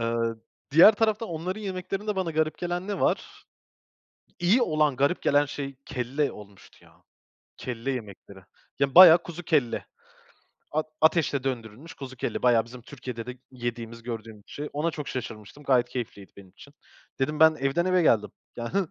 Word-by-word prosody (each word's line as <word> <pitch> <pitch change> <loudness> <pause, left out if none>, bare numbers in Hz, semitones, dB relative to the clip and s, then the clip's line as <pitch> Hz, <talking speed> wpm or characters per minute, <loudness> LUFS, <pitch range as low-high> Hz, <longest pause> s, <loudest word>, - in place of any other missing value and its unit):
Eee, 115 0 0 0.4
diğer 170 +9 +8
tarafta 220 +1 0
onların 180 +5 -4
yemeklerinde 195 +1 -4
bana 185 -3 -1
garip 155 0 0
gelen 175 +2 -3
ne 205 - -3
var? - - -1 0.9
İyi 200 +8 +3
olan 155 - +1
garip 140 +6 +1
gelen 145 +1 +4
şey, 140 -1 -6
kelle 130 +4 -2
olmuştu, 100 -2 -15
ya. - - -23 0.5
Kelle 125 +1 -4
yemekleri. 100 -5 -7 0.4
Ya, 140 -1 0
bayağı 175 -1 +10
kuzu 175 0 -8
kelle. 145 -8 0 0.8
At 155 +1 -1
ateşte 155 -4 +2
döndürülmüş 125 +3 -5
kuzu 130 -2 -9
kelle. - - -3
Bayağı 120 -3 +4
bizim 120 +1 -12
Türkiye'de 125 -3 -8
de 125 - -5
g 125 - -20
yediğimiz 120 -2 -6
gördüğümüz 110 -3 -7
şey. 150 +1 -6
Ona 155 +4 0
çok 150 -2 -6
şaşırmıştım, 115 +2 -7
gayet 125 -3 +3
keyifliydi 120 -5 -6
benim 95 -2 -14
için. 140 +9 -17 0.5
Dedim, 150 +3 -1
"Ben 160 0 +7
evden 140 +6 +1
eve 185 -1 +3
geldim." 105 -8 +3 0.3
Ya 120 -1 -5
hıh! 195 -2 +2
140 Hz, 160 wpm, -26 LUFS, 120-165 Hz, 0.9 s, bayağı